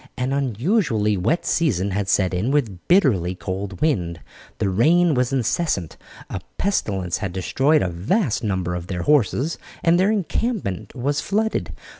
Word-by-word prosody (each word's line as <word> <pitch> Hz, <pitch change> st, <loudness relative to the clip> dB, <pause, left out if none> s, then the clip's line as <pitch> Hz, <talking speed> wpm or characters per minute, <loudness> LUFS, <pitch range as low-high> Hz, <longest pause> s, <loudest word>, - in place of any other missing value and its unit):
An 125 Hz, +2 st, -1 dB
unusually 130 Hz, -, +1 dB
wet 110 Hz, -, 0 dB
season 100 Hz, -, +1 dB
had 100 Hz, 0 st, -2 dB
set 95 Hz, -2 st, +2 dB
in 95 Hz, +7 st, 0 dB
with 115 Hz, -11 st, -1 dB
bitterly 110 Hz, -, +3 dB
cold 95 Hz, +1 st, -5 dB
wind. 90 Hz, -, 0 dB, 0.4 s
The -, -, 0 dB
rain 160 Hz, -, +3 dB
was 125 Hz, -1 st, +1 dB
incessant, 125 Hz, -, -1 dB, 0.3 s
a -, -, -5 dB, 0.2 s
pestilence 95 Hz, -, -1 dB
had 95 Hz, -2 st, -4 dB
destroyed 135 Hz, -, +2 dB
a -, -, 0 dB
vast 110 Hz, -, 0 dB
number 95 Hz, -4 st, -1 dB
of 90 Hz, 0 st, -5 dB
their 90 Hz, -3 st, -3 dB
horses, 150 Hz, +2 st, +2 dB, 0.2 s
and 170 Hz, +1 st, +4 dB
their 190 Hz, +2 st, +3 dB
encampment 190 Hz, -, -2 dB
was 140 Hz, +4 st, -1 dB
flooded. 220 Hz, +5 st, -1 dB
115 Hz, 150 wpm, -22 LUFS, 95-160 Hz, 0.4 s, and